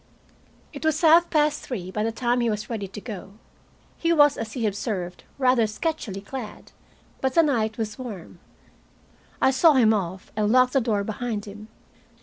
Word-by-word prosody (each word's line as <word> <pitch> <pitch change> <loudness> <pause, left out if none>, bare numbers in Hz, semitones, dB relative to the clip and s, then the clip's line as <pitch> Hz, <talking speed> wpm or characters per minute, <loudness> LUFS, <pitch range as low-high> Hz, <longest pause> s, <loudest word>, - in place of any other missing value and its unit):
It 285 - -8
was 315 -2 +1
half 335 +1 +6
past 300 -1 +2
three 185 -8 -6
by 210 - -2
the 225 +1 0
time 240 +1 0
he 235 - +1
was 215 +2 -4
ready 210 -4 -3
to 195 +2 -9
go. 205 -3 -8 0.7
He 335 - +1
was, 290 -3 +5
as 220 -2 -6
he 235 -3 -2
observed, 195 -4 -3
rather 255 -4 +3
sketchily 215 - -3
clad, 245 -1 -8 0.5
but 265 -1 -1
the 330 - +6
night 225 -7 0
was 220 -1 -4
warm. 200 -9 -8 1.0
I 265 - +5
saw 305 +4 +5
him 230 -5 +5
off, 185 -2 -4
and 210 0 +1
locked 255 0 +4
the 270 - +3
door 215 -4 0
behind 220 0 -4
him. 210 +1 -10
225 Hz, 175 wpm, -24 LUFS, 210-265 Hz, 1.0 s, half